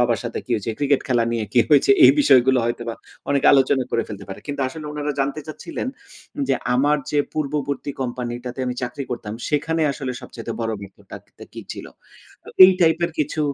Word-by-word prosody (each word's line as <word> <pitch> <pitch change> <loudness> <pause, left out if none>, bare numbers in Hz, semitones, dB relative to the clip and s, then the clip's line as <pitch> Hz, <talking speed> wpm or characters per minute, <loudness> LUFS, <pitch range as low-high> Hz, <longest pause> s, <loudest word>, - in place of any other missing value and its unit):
বাবার 120 -2 +2
সাথে 115 - -4
কি - - -16
হয়েছে, 110 +1 -2
ক্রিকেট 140 -1 +2
খেলা 120 -3 +2
নিয়ে 115 -2 -1
কি 120 - +5
হয়েছে 150 - +5
এই - - +10
বিষয়গুলো 130 - +5
হয়তোবা 120 -1 -3 0.4
অনেকে 140 -1 +2
আলোচনা 135 -1 +3
করে 115 - +1
ফেলতে 100 -2 -8
পারে। 95 - -8
কিন্তু 145 -1 -4
আসলে 150 +3 -9
উনারা 150 0 -3
জানতে 140 +3 -1
চাচ্ছিলেন, 255 - -6 0.6
যে - - +3 0.2
আমার 145 +4 +3
যে 150 - +1
পূর্ববর্তী 145 -2 -3
কোম্পানিটাতে 125 0 -5
আমি 125 - -2
চাকরি 125 +3 -4
করতাম, 115 -3 -5 0.2
সেখানে 160 +2 0
আসলে 135 -2 -5
সবচাইতে 115 0 -7
বড় 115 -1 -1
ব্যর্থটা 100 -1 -13
কী - - -8
ছিলো? - - -9 0.5
তো - - -14 0.2
এই 185 - +8
টাইপের 170 0 +3
কিছু 155 +1 -1
130 Hz, 180 wpm, -22 LUFS, 120-150 Hz, 0.6 s, এই